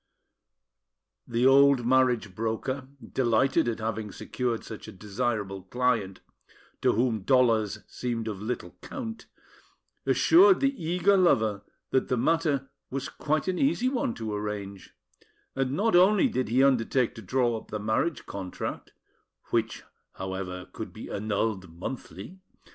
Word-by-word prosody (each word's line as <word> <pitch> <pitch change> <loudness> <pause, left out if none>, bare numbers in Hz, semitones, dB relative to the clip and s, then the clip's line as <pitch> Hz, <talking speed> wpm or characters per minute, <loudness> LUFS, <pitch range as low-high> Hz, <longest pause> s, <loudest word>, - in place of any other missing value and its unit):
The 120 +1 +1
old 135 -2 +6
marriage 125 -5 +2
broker, 115 +6 -3 0.3
delighted 130 +4 +2
at 115 - -1
having 110 -1 -3
secured 120 +5 -3
such 110 - -9
a - - -7
desirable 105 -1 -3
client, 110 -2 -1 0.6
to - - +3
whom 115 -1 +1
dollars 110 -3 +2
seemed 115 -2 -4
of 105 -3 -5
little 120 +3 -4
count, 230 -5 -7 0.8
assured 375 +3 +6
the 275 0 +2
eager 180 +4 +3
lover 110 - +3 0.3
that 130 - +2
the 125 - 0
matter 145 -2 +1 0.2
was 135 0 -4
quite 155 +2 -1
an 185 -1 0
easy 265 -2 +2
one 245 - -1
to 110 -2 -4
arrange; 105 -2 -5 0.6
and 135 -1 0
not 205 +5 +2
only 200 +8 +6
did 130 - -2
he 130 +4 +4
undertake 130 -2 +2
to 115 - -10
draw 120 +4 +1
up 110 - -8
the 105 - -4
marriage 110 +8 -1
contract 95 -2 -6 0.6
(which, - - 0 0.3
however, 95 -1 -5
could - - -6
be - - -9
annulled 100 -3 -2
monthly!) 100 - -7
120 Hz, 135 wpm, -27 LUFS, 105-140 Hz, 0.8 s, old